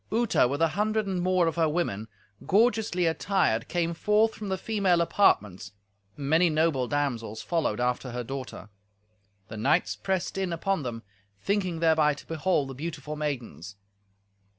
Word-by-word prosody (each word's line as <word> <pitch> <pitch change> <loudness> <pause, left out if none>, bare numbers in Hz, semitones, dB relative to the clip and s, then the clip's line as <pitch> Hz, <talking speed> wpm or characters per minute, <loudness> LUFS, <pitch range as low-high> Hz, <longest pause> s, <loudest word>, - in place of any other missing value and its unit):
Uta, 225 - +3
with 140 +5 -1
an 165 - +4
hundred 215 +2 0
and 190 -2 -2
more 185 -1 +2
of 165 0 -1
her 160 -2 +3
women, 130 - -2 0.4
gorgeously 210 -4 +2
attired, 165 - +1
came 170 -1 -1
forth 210 +5 +2
from 210 -2 -7
the 190 - -1
female 195 -5 +1
apartments, 105 - +1 0.4
and 140 -2 -5
many 165 +4 +4
noble 155 -5 +1
damsels 120 -7 -2
followed 160 -11 -1
after 125 +1 -1
her 125 0 -4
daughter. 130 -5 -7 0.8
The 110 - -8
knights 105 0 +1
pressed 185 - -2
in 190 -2 -1
upon 180 +1 -1
them, 120 -4 -5 0.4
thinking 185 -5 -1
thereby 155 -3 +3
to - - -13
behold 160 -3 0
the - - -6
beautiful 150 +1 -6
maidens. 120 - -5
160 Hz, 155 wpm, -27 LUFS, 125-190 Hz, 0.8 s, an